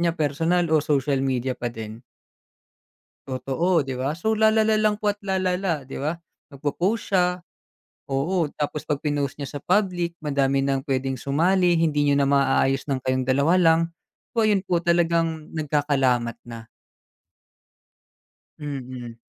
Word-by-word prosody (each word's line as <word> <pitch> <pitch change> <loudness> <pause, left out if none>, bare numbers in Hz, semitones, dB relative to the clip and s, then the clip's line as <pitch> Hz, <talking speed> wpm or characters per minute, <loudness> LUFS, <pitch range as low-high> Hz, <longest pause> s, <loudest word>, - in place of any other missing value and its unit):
niya 170 0 +1
personal 165 +4 +1
o 155 - +5
social 140 -2 +1
media 130 -1 -1
pa 120 - -3
din? 110 0 -8 1.3
Totoo, 145 +5 0
'di 135 -1 -4
ba? 140 +5 -1
So 220 +6 0
lalala 220 0 +3
lang 210 -1 +2
po 205 -1 0
at 205 - -20
lalala, 185 -5 -1
'di 135 - -8
ba? 155 +4 -1 0.3
Mag 140 -2 -13
po-post 190 +11 -1
siya 180 -1 +1 0.7
oo. 160 +6 0
Tapos 150 0 -3
'pag 145 -1 -2
pinost 145 -3 -2
niya 145 +1 -5
sa - - -8
public 180 -3 +1
madami 140 -2 +1
ng 135 +1 -1
puwedeng 135 -1 -1
sumali, 175 +7 +2
hindi 150 -3 +2
niyo 140 - +3
na 140 0 +2
maayos 135 -1 +2
ng 135 -3 -2
kayong 130 0 0
dalawa 140 +7 +3
lang, 165 -2 +5 0.5
so 225 -2 +2
ayun 205 -3 +3
po 180 - +1
talagang 165 -2 +1
nagkakalamat 140 -6 0
na. 115 -1 -10 1.9
Mm. 130 -5 -6
150 Hz, 145 wpm, -24 LUFS, 135-175 Hz, 1.9 s, o